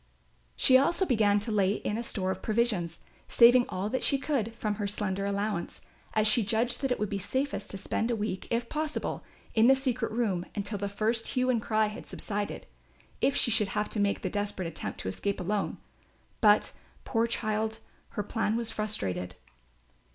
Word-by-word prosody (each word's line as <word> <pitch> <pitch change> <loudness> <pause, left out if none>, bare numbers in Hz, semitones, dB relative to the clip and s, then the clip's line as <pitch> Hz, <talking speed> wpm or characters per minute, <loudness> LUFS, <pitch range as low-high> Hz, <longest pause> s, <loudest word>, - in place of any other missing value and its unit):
She 260 0 +6
also 345 +7 +2
began 215 - +3
to 220 - -3
lay 200 -2 +3
in 210 - -3
a 230 - -2
store 190 -5 -2
of 190 0 -5
provisions, 215 -7 0 0.3
saving 245 +1 +6
all 185 +2 -2
that 260 - -1
she 275 - +4
could 260 -5 -1
from 215 -2 -1
her 205 - 0
slender 200 -1 -2
allowance, 200 -2 -2 0.4
as 215 -1 +3
she 220 +2 +6
judged 230 +4 0
that 270 - 0
it 250 - +2
would 210 - 0
be 200 0 -3
safest 260 +1 -2
to 195 - -5
spend 220 +4 -1
a 235 - +1
week 210 -3 -3
if 235 0 0
possible, 310 +2 -2 0.3
in 225 +1 +5
the 270 - +7
secret 255 -4 -1
room 215 -6 0
until 205 0 -3
the 200 0 -2
first 220 +3 0
hue 255 0 +1
and 235 -3 +1
cry 215 0 +2
had 210 0 -7
subsided, 205 -1 -4 0.6
if 275 - +3
she 235 - +2
should 210 -1 +2
have 210 - 0
to 215 - -3
make 200 0 +1
the 185 - 0
desperate 205 -3 -2
attempt 165 - -6
to - - -6
escape 200 - -2
alone; 200 +3 -1 0.6
but, 210 -1 +5 0.3
poor 230 -1 +1
child, 220 -1 -1 0.3
her 210 - -3
plan 220 +1 -1
was 230 -1 0
frustrated. 95 - -2
215 Hz, 190 wpm, -29 LUFS, 200-235 Hz, 0.6 s, the